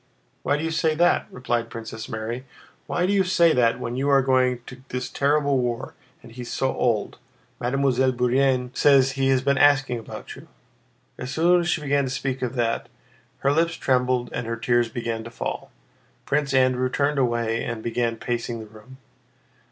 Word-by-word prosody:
"Why 145 - +1
do 150 - -4
you 165 - -1
say 160 -1 +1
that?" 175 +2 +2
replied 120 -2 -2
Princess 110 -1 -7
Mary. 110 +3 -4 0.4
"Why 175 - 0
do 195 - +1
you 195 -1 +4
say 170 -3 +4
that, 115 -2 +2
when 120 0 -4
you 135 +2 0
are 135 -1 +5
going 130 -2 +2
to 125 0 -11
this 125 0 -4
terrible 145 -1 +2
war, 125 +1 -3 0.3
and 115 - -13
he 125 +2 -9
is 120 - -7
so 135 0 0
old? 115 -4 0 0.4
Mademoiselle 130 0 +1
Bourienne 125 0 +1
says 135 -2 +5
he 135 0 0
has 130 -1 +2
been 140 0 +2
asking 135 -4 +4
about 115 - -9
you...." - - -14 0.7
As 125 - -5
soon 170 +5 +3
as 170 - -2
she 160 - 0
began 140 -1 +1
to - - -3
speak 130 0 -3
of 125 0 -3
that, 115 -2 -1 0.5
her 140 - +3
lips 165 +2 +1
trembled 125 -1 0
and 115 -1 -3
her 115 0 -3
tears 120 0 +1
began 115 -1 -4
to 115 - -8
fall. 115 - -5 0.6
Prince 145 -1 0
Andrew 130 -1 +2
turned 140 +2 0
away 115 -2 0
and 115 -2 -4
began 115 0 -1
pacing 120 0 -3
the 110 - -8
room. 110 +5 -15
130 Hz, 190 wpm, -24 LUFS, 120-140 Hz, 0.7 s, are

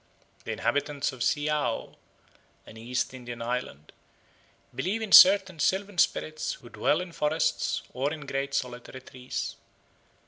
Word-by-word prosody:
The - - -3
inhabitants 145 0 -1
of 130 - -12
Siaoo, 145 -2 -1 0.7
an - - -13
East 120 +3 -3
Indian 120 -2 -8
island, 115 - -4 0.8
believe 200 +5 -2
in 220 -3 -5
certain 190 -3 +8
sylvan 195 +3 0
spirits 155 0 0
who 120 - -13
dwell 155 +7 +1
in 180 -1 -7
forests 155 0 0
or 135 +3 -1
in 155 -1 -6
great 140 0 -3
solitary 125 0 -4
trees. 130 0 -6
140 Hz, 130 wpm, -27 LUFS, 125-160 Hz, 0.8 s, certain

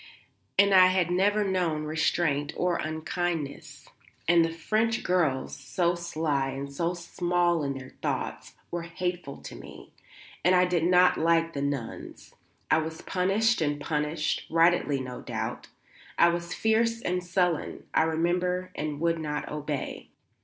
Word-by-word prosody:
And 200 0 +5
I 185 -1 +8
had 185 -2 +1
never 205 +4 +3
known 180 -6 0
restraint 150 -1 0
or 180 -1 +1
unkindness, 160 -1 -4 0.4
and 170 0 +6
the 165 - 0
French 220 +7 0
girls, 160 -8 0
so 170 +6 0
sly 155 -5 -1
and 140 +1 -6
so 170 +4 -1
small 175 0 0
in 140 -1 -2
their 130 -1 -10
thoughts, - - -3 0.2
were 175 - -2
hateful 170 -3 -4
to - - -8
me. - - -12 0.5
And 180 +3 +5
I 180 0 +5
did 175 -2 +1
not 180 0 +5
like 165 0 +2
the 140 - -3
nuns. 140 -5 -5 0.4
I 160 - +5
was 160 0 -5
punished 195 +4 +1
and 145 -1 0
punished 150 +1 -1
rightly 165 -4 +3
no 125 -1 -6
doubt. - - -4 0.5
I 170 - +6
was 170 0 -3
fierce 230 +1 +1
and 180 0 -1
sullen, 180 -2 -1
I - - +4
remember, 180 +3 0
and 150 -1 -4
would 165 0 +1
not 150 -1 -3
obey. 150 -2 -4
170 Hz, 145 wpm, -28 LUFS, 150-180 Hz, 0.5 s, I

